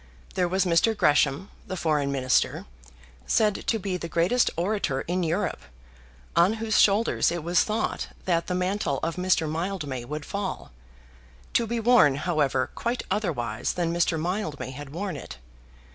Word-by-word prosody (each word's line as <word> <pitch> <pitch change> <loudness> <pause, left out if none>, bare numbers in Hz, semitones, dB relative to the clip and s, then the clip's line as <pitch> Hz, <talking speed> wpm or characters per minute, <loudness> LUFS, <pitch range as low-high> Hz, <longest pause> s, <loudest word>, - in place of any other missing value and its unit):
There 180 -1 +1
was 190 +2 +1
Mr. 180 +6 +3
Gresham, 145 +3 +2 0.2
the 185 - -4
Foreign 150 -4 +1
Minister, 130 -2 +1 0.6
said 210 -2 +1
to 225 - +2
be 190 -3 -3
the 170 -1 -6
greatest 175 +10 +2
orator 175 -7 0
in 180 +2 -2
Europe, 170 - -1 0.7
on 170 +5 +5
whose 220 -1 +2
shoulders 205 -2 +3
it 170 -2 -3
was 175 +2 +3
thought 215 +1 -2 0.2
that 170 -2 +1
the 180 - -1
mantle 180 -6 -1
of 165 +1 -1
Mr. 180 -3 +2
Mildmay 155 -6 -3
would 150 +3 -5
fall, 200 -1 -4 0.8
to 235 - +2
be 235 +1 -1
worn, 225 - +5
however, 145 -4 0
quite 240 +1 -2
otherwise 125 - -1
than 170 -2 -1
Mr. 170 -1 +1
Mildmay 155 - -3
had 145 +1 -8
worn 180 +4 -4
it. 65 - -8
175 Hz, 155 wpm, -26 LUFS, 150-200 Hz, 0.8 s, on